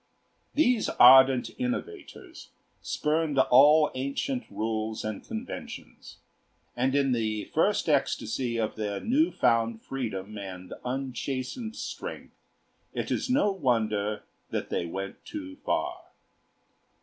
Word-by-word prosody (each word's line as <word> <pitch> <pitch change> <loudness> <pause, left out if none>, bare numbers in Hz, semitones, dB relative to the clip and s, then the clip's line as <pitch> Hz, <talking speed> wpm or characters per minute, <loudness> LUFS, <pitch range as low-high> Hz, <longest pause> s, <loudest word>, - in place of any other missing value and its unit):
These 250 -7 +3
ardent 130 0 +7
innovators 260 +12 -5 0.3
spurned 150 -1 -1
all 145 +4 +6
ancient 140 - -2
rules 110 0 -3
and 110 -1 -4
conventions, - - -8 0.6
and 130 +2 +1
in 140 -2 +2
the 110 -3 -1
first - - +2
ecstasy 120 -3 0
of 110 0 -2
their 105 -2 -2
new 300 +8 +2
found 115 -2 +1
freedom 110 -6 -5
and 95 -2 -8
unchastened 135 - -4
strength - - -7 0.6
it - - -3
is - - -1
no 255 -6 +3
wonder 110 - 0 0.3
that - - -4
they 85 - -1
went 95 +3 -6
too 290 -2 -8
far. - - -2
130 Hz, 110 wpm, -28 LUFS, 110-160 Hz, 0.6 s, ardent